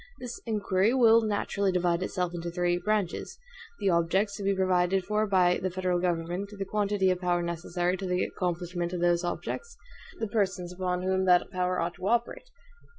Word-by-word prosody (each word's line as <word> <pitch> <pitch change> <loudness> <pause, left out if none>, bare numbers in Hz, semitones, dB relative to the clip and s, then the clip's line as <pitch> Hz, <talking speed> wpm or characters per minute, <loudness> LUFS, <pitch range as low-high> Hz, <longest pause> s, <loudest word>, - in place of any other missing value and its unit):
This 245 -1 -7
inquiry 210 +1 +1
will 230 -3 +6
naturally 200 -2 0
divide 175 -1 +1
itself 180 -1 -2
into 170 0 -4
three 175 0 0
branches 210 -3 -2 0.4
the 195 - +2
objects 190 +5 +1
to 205 - -6
be 195 0 +1
provided 185 0 +2
for 210 +2 0
by 180 -3 +3
the 185 - 0
federal 180 -1 -1
government, 175 +2 -2
the 195 - -3
quantity 200 -1 +1
of 180 0 -2
power 175 -1 +1
necessary 175 +1 -1
to 190 0 -4
the 180 0 +1
accomplishment 175 -1 -3
of 175 - -3
those 175 0 +2
objects, 325 - -4 0.4
the 225 - -1
persons 190 -4 -1
upon 180 0 -2
whom 190 0 +1
that 180 +1 +4
power 180 -1 0
ought 170 +1 -1
to 190 - -4
operate. 240 - -1
185 Hz, 180 wpm, -28 LUFS, 175-200 Hz, 0.4 s, will